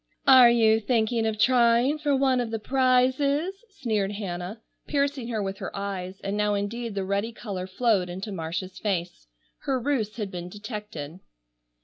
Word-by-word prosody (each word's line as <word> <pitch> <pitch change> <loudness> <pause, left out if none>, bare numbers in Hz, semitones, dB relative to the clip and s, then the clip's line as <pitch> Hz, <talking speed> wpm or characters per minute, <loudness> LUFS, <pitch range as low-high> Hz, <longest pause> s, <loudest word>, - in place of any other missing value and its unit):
"Are 260 -3 +9
you 225 -2 +4
thinking 225 0 +1
of 220 -1 -2
trying 240 +5 +4
for 295 -2 +1
one 265 -2 +2
of 240 - -3
the 225 - -2
prizes?" 270 - +1
sneered 215 - -2
Hannah, 190 0 -5 0.3
piercing 280 -4 0
her 220 -3 -2
with 195 0 -4
her - - -4
eyes, 195 -1 -5
and 195 +1 -2
now 210 0 +1
indeed 215 +2 -3
the 195 -1 -2
ready 200 +4 -1
color 195 -5 -6
flowed 195 -2 +1
into 190 +4 -5
Marcia's 185 +1 -5
face. 175 - -3 0.3
Her 270 -2 -1
ruse 235 -5 -1
had 210 -4 -4
been 175 0 -6
detected. 205 - -7
220 Hz, 160 wpm, -26 LUFS, 195-250 Hz, 0.3 s, Are